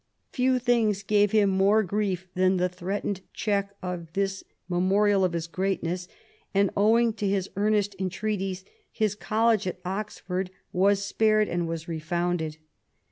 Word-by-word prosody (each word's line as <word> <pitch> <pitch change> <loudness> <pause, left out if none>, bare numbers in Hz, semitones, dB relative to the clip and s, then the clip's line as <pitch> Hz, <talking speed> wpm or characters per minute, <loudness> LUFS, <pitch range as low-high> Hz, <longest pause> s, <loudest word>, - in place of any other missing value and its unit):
Few 255 0 +2
things 230 -5 +1
gave 205 0 +3
him 210 -3 +4
more 200 +3 +4
grief 195 -1 -1
than 185 +1 +3
the 180 0 +2
threatened 185 +2 -3
check 200 -1 -1
of 175 -3 -5
this 195 -1 -1 0.2
memorial 195 +2 +3
of 180 -2 +1
his 165 -1 -2
greatness, 180 0 -2 0.5
and 200 0 +3
owing 225 +3 +4
to 210 -2 -2
his 195 -1 -1
earnest 205 0 +1
entreaties 190 0 -2 0.3
his 215 -3 0
college 220 -1 +1
at 180 - -4
Oxford 190 -1 -3 0.2
was 200 +2 +3
spared 215 0 +3
and 175 -1 -1
was 165 0 -5
refounded. 165 0 -2
195 Hz, 140 wpm, -26 LUFS, 180-210 Hz, 0.5 s, him